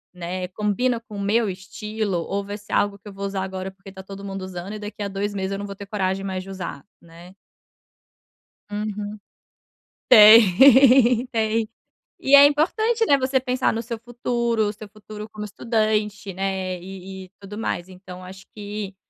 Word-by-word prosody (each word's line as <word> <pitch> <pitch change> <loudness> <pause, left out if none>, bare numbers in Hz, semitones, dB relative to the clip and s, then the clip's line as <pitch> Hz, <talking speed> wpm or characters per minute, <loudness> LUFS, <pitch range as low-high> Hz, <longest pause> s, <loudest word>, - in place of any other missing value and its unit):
né, 180 +1 -4
combina 210 +5 -1
com 215 -3 -11
o - - -4
meu 215 +2 +1
estilo 195 0 -4
ou 200 0 -2
vai 205 +1 -6
ser 205 - -11
algo 205 -1 +1
que 205 - -17
eu 200 - -9
vou 200 0 -5
usar 195 -1 -3
agora 190 0 -5
porque 195 +1 -14
está 190 0 -10
todo 195 +1 -10
mundo 195 -1 -5
usando 185 +2 -7
e 215 - -6
daqui 210 0 -7
a - - -2
2 200 +1 -3
meses 190 0 -3
eu 195 - -3
não 205 - -5
vou 200 - -7
ter 200 - -9
coragem 195 -1 -2
mais 190 -1 -3
de 195 - -12
usar?", 180 -7 -6 0.2
né. 170 +3 -15 1.4
Uhum. 210 0 -4 0.9
Tem, 240 +3 +7
tem. 225 -1 0 0.5
E 280 +1 +5
é 280 - +10
importante, 435 +11 +2
né, 280 - +5
você 260 0 +1
pensar 255 0 0
no 230 +1 -3
seu 230 -1 -6
futuro, 235 -1 -1
o 205 - -3
seu 210 0 -11
futuro 215 0 -10
como 210 -1 -7
estudante, 210 -2 -1
né, 190 -1 -3
e 190 0 -9
e - - -20
tudo 200 +1 -10
mais 180 -5 -3
então 185 -1 -11
acho 190 +1 -11
que 205 -2 -6
205 Hz, 185 wpm, -23 LUFS, 190-225 Hz, 1.4 s, é